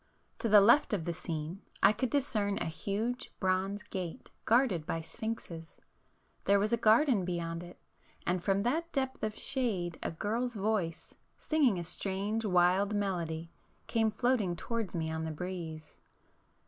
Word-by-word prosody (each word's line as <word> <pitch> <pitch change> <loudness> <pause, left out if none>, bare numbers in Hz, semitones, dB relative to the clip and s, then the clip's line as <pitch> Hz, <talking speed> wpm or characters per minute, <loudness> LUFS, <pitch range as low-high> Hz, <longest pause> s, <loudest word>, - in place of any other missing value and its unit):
To 230 - -1
the 210 -1 +8
left 235 +6 +5
of 180 -6 -1
the 170 - -1
scene 165 +3 -5 0.2
I - - +7
could 255 +3 -1
discern 215 -8 +1
a - - -2
huge 205 +10 -3
bronze 190 +2 0
gate 180 -4 -6
guarded 225 - +3
by 165 -2 -1
sphinxes; 165 -3 -6 0.7
there 200 +1 +5
was 210 +3 +1
a - - +7
garden 225 0 +4
beyond 170 -2 -3
it, 175 0 -11 0.5
and 180 0 0
from 195 0 +2
that 325 +8 0
depth 265 -2 -1
of 215 -1 -2
shade 195 - -1
a - - -1
girl's 225 +8 -2
voice, 200 -5 -1 0.2
singing 285 - +2
a 175 - -3
strange 195 +5 -2
wild 190 +1 +3
melody, 170 -5 -2 0.3
came 225 -2 +2
floating 215 -4 +1
towards 225 +1 -3
me 160 -1 -1
on 160 0 -3
the 160 - -2
breeze. 160 -1 -6
200 Hz, 155 wpm, -32 LUFS, 170-225 Hz, 0.7 s, the